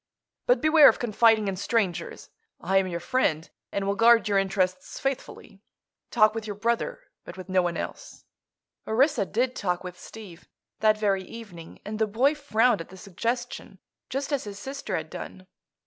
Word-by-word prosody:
"But -, -, +3 dB
beware 310 Hz, -2 st, +7 dB
of -, -, 0 dB
confiding 225 Hz, -2 st, +3 dB
in 195 Hz, -, -1 dB
strangers. 195 Hz, -3 st, -2 dB, 0.3 s
I 190 Hz, +3 st, +1 dB
am 190 Hz, -1 st, +2 dB
your 170 Hz, -2 st, -4 dB
friend, 170 Hz, -4 st, 0 dB, 0.2 s
and 200 Hz, -, -2 dB
will 200 Hz, -, +1 dB
guard 230 Hz, +1 st, +5 dB
your 200 Hz, -1 st, +3 dB
interests 185 Hz, -1 st, -1 dB
faithfully. 260 Hz, -6 st, -5 dB, 0.5 s
Talk 215 Hz, -3 st, +4 dB
with 220 Hz, -1 st, -5 dB
your 205 Hz, -, -4 dB
brother, 235 Hz, -, -1 dB, 0.2 s
but -, -, -10 dB
with 185 Hz, 0 st, -9 dB
no 185 Hz, 0 st, +3 dB
one 175 Hz, -1 st, -2 dB
else." -, -, -7 dB, 0.6 s
Orissa 255 Hz, -1 st, +2 dB
did 250 Hz, +3 st, 0 dB
talk 180 Hz, -2 st, -2 dB
with 180 Hz, -1 st, -8 dB
Steve, 200 Hz, -7 st, -12 dB, 0.3 s
that 215 Hz, 0 st, +3 dB
very 200 Hz, -3 st, +1 dB
evening, 185 Hz, -6 st, -11 dB
and 215 Hz, +1 st, -5 dB
the 220 Hz, -, +2 dB
boy 250 Hz, +8 st, +2 dB
frowned 245 Hz, -, +2 dB
at 165 Hz, -, -10 dB
the 190 Hz, -, -12 dB
suggestion 230 Hz, +7 st, -4 dB, 0.3 s
just 275 Hz, +2 st, -3 dB
as 275 Hz, -, -1 dB
his 200 Hz, -1 st, -7 dB
sister 270 Hz, -5 st, -5 dB
had 155 Hz, -1 st, -6 dB
done. 185 Hz, +1 st, -8 dB
215 Hz, 175 wpm, -26 LUFS, 185-240 Hz, 0.6 s, beware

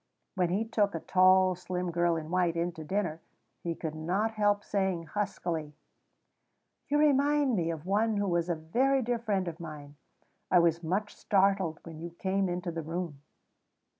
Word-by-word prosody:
When 180 Hz, -3 st, +1 dB
he 200 Hz, +6 st, 0 dB
took 210 Hz, -4 st, +1 dB
a -, -, -2 dB
tall, 185 Hz, +1 st, +5 dB
slim 180 Hz, 0 st, -3 dB
girl 170 Hz, 0 st, +2 dB
in 160 Hz, 0 st, -5 dB
white 180 Hz, -2 st, +2 dB
in 170 Hz, +1 st, 0 dB
to 160 Hz, -2 st, -9 dB
dinner, 170 Hz, -2 st, -2 dB, 0.4 s
he 170 Hz, -1 st, -3 dB
could 160 Hz, -2 st, -4 dB
not 180 Hz, +8 st, -1 dB
help 205 Hz, -2 st, +1 dB
saying 190 Hz, -4 st, -1 dB
huskily: 165 Hz, -6 st, -3 dB, 1.1 s
"You 295 Hz, -, +3 dB
remind 290 Hz, -2 st, +3 dB
me 170 Hz, -4 st, 0 dB
of 165 Hz, -1 st, -5 dB
one 210 Hz, +3 st, +1 dB
who 205 Hz, 0 st, 0 dB
was 170 Hz, -1 st, 0 dB
a 170 Hz, -, +1 dB
very 255 Hz, +13 st, +1 dB
dear 240 Hz, 0 st, -1 dB
friend 200 Hz, -5 st, -1 dB
of 170 Hz, 0 st, -5 dB
mine. 145 Hz, -3 st, -9 dB, 0.5 s
I 180 Hz, -, +5 dB
was 170 Hz, -1 st, +3 dB
much 195 Hz, +6 st, -2 dB
startled 195 Hz, -4 st, +1 dB
when 160 Hz, -2 st, -9 dB
you 170 Hz, -, -5 dB
came 190 Hz, +2 st, -1 dB
into 175 Hz, 0 st, -3 dB
the 165 Hz, 0 st, -4 dB
room." 165 Hz, -2 st, -5 dB
180 Hz, 175 wpm, -30 LUFS, 165-205 Hz, 1.1 s, tall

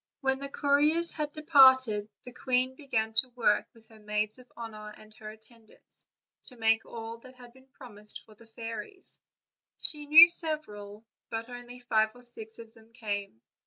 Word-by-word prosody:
When 265 Hz, -1 st, 0 dB
the 280 Hz, 0 st, -6 dB
couriers 295 Hz, +4 st, +1 dB
had 300 Hz, -1 st, -4 dB
departed 260 Hz, -9 st, +4 dB
the 250 Hz, -, -12 dB
queen 255 Hz, 0 st, 0 dB
began 225 Hz, -6 st, -3 dB
to 225 Hz, +4 st, +4 dB
work 210 Hz, -4 st, +1 dB
with 225 Hz, -1 st, -22 dB
her 220 Hz, -1 st, -17 dB
maids 210 Hz, +2 st, -3 dB
of 250 Hz, -1 st, -18 dB
honor 215 Hz, -2 st, -9 dB
and 215 Hz, 0 st, -17 dB
her 215 Hz, 0 st, -10 dB
attendants, 220 Hz, +1 st, -20 dB, 0.4 s
to. 250 Hz, -, -11 dB
make 225 Hz, 0 st, +2 dB
all 230 Hz, 0 st, -8 dB
that 255 Hz, +2 st, -16 dB
had 245 Hz, -1 st, -15 dB
been 260 Hz, +1 st, -21 dB
promised 210 Hz, -6 st, -5 dB
for 220 Hz, -, -18 dB
the 230 Hz, +2 st, -19 dB
fairies; 230 Hz, -, -9 dB, 0.6 s
she 295 Hz, -1 st, +3 dB
knew 325 Hz, +3 st, +9 dB
several, 220 Hz, -11 st, -5 dB, 0.2 s
but 225 Hz, +1 st, -5 dB
only 245 Hz, 0 st, -10 dB
five 220 Hz, -3 st, 0 dB
or 245 Hz, -, -16 dB
six 225 Hz, -2 st, -3 dB
of 230 Hz, -1 st, -13 dB
them 225 Hz, 0 st, -21 dB
came. 205 Hz, -, -5 dB
235 Hz, 170 wpm, -28 LUFS, 220-265 Hz, 0.6 s, knew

